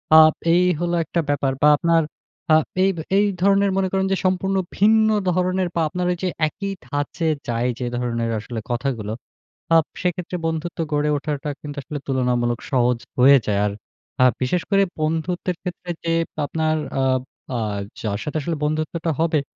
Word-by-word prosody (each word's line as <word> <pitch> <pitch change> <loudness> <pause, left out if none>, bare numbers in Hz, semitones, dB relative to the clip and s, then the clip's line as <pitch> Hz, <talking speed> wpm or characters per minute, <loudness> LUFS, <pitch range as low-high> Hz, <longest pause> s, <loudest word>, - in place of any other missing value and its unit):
আ - - +10 0.4
এই 180 +1 +5 0.2
হল 175 0 -1
একটা 170 - -2
ব্যাপার। 140 -2 +1
বা 150 - +6
আপনার 165 +1 +3 0.5
আ - - +8 0.3
এইব 195 -1 +2 0.2
এই 205 - +4 0.2
ধরনের 200 +1 +4
মনে 190 -1 +2
করেন 190 0 +1
যে 195 - +2
সম্পূর্ণ 190 +1 +1 0.2
ভিন্ন 220 +2 +5 0.2
ধরনের 185 +1 +1
বা 170 - +2
আপনার 180 +2 -2
ওই 175 - -2
যে 185 - +1 0.2
একই 195 +5 -5 0.2
ধাঁচের 150 +4 -1
যায় 120 +1 0
যে 125 - -2
ধরনের 115 -1 -1
আসলে 115 +2 -6
কথাগুলো 120 -4 -2 0.6
আব 165 - +5 0.2
সেক্ষেত্রে 180 0 -2
বন্ধুত্ব 165 +1 -3
গড়ে 150 0 +1
ওঠাটা 145 0 -3
কিন্তু 145 -1 -7
আসলে 145 +3 -5
তুলনামূলক 125 -3 0
সহজ 125 -2 +3 0.2
হয়ে 135 +2 +8
যায়। 100 -2 +1
আর 105 - -1 0.5
আ - - +8 0.2
বিশেষ 170 +8 +1
করে 195 -1 +4 0.2
বন্ধুত্বের 165 +3 -1
ক্ষেত্রে 180 -1 -6
যে 165 - +1 0.3
আপনার 155 +1 0 0.2
আ - - +2 0.5
আ - - -1 0.4
যার 100 -2 -2
সাথে 150 - -4
আসলে 165 +2 -2
বন্ধুত্বটা 155 +2 -1
হবে, 160 -2 +2
160 Hz, 165 wpm, -22 LUFS, 130-180 Hz, 0.6 s, আ